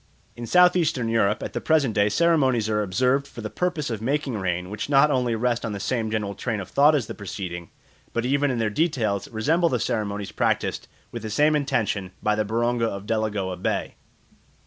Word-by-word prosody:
In 120 0 -7
South 180 +3 +5
eastern 150 -9 0
Europe 110 -2 +1
at - - -5
the - - -3
present 150 -7 +2
day 105 0 +3
ceremonies 130 -6 +2
are 105 -1 +1
observed 125 +8 +1
for 120 - -10
the 110 - -5
purpose 165 -7 -2
of 110 -2 -4
making 135 +1 -1
rain 90 -2 -2
which 105 - -4
not 145 +1 +5
only 125 -4 +1
rest 120 +1 0
on 110 - -3
the 100 - -5
same 115 0 -1
general 105 -2 -2
train 110 +2 -3
of 95 - -7
thought 150 +2 +5
as 135 -6 0
the - - -7
preceding, 90 -3 -6 0.4
but 115 0 -2
even 140 +2 +2
in 125 - -1
their 110 -2 0
details 110 - 0
resemble 160 +10 +1
the 125 - 0
ceremonies 105 -5 -2
practised - - -1 0.2
with 120 - -6
the 110 - -5
same 150 +8 +3
intention 110 -10 -1
by 105 - +2
the 110 0 +1
Baronga 115 +2 0
of 100 -2 -5
Delagoa 105 -4 -1
Bay. 90 - -2
115 Hz, 205 wpm, -24 LUFS, 105-140 Hz, 0.4 s, South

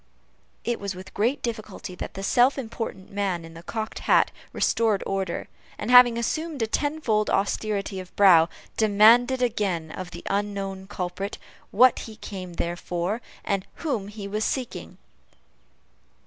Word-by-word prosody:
It 240 -1 -1
was 200 -2 -4
with 185 +1 -10
great 235 +7 0
difficulty 215 -5 -5
that 180 - -7
the 195 - -5
self 250 +7 +4
important 225 -5 -5
man 195 -4 -1
in 165 - -12
the 165 - -10
cocked 220 +4 -4
hat - - +3 0.2
restored 220 -3 +1
order; 190 -3 -2 0.3
and 225 - -3
having 245 -2 +8
assumed 305 +3 -2
a - - +3
tenfold 230 -4 0
austerity 200 0 -1
of 185 -1 -10
brow, 175 -5 +7 0.3
demanded 230 +4 +5
again 195 -9 -1
of 185 +1 -6
the - - -9
unknown 195 -1 -2
culprit, 195 0 -4 0.3
what 250 +4 +5
he 220 - -10
came 185 -4 -7
there 170 0 -2
for, 180 +6 -3 0.2
and 195 -1 -1
whom 240 -12 -2
he 205 -1 -7
was 210 +2 -2
seeking. 255 +1 -3
205 Hz, 150 wpm, -25 LUFS, 190-230 Hz, 0.3 s, having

